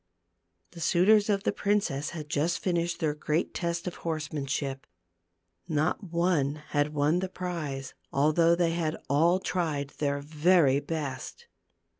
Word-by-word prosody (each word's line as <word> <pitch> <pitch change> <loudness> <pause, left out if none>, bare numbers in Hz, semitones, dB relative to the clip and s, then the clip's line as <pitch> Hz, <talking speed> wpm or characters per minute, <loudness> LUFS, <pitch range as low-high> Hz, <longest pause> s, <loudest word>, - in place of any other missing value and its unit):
The - - -11
suitors 200 +6 +4
of 200 -1 +1
the - - +2
prin 205 +1 +1
^ - - -7
cess 140 +3 -3
had 155 -3 -7
just 160 +2 0
finished 175 -2 -1
their 155 -2 +1
great 150 +2 -1
test 170 -1 -2
of 180 - -5
horse 155 -3 -4
manship. 135 -1 -3 0.8
Not 155 +5 0
one 165 -4 0
had 145 +1 0
won 150 +4 +2
the 190 0 -3
prize, 155 -8 -4 0.2
although 155 +4 +4
they 170 -1 +2
had 165 -2 -1
all 170 +6 +4
tried 155 -7 -2
their 140 -1 0
i - - -6
very 150 -1 +3
best. 155 - -5
160 Hz, 155 wpm, -28 LUFS, 145-175 Hz, 0.8 s, suitors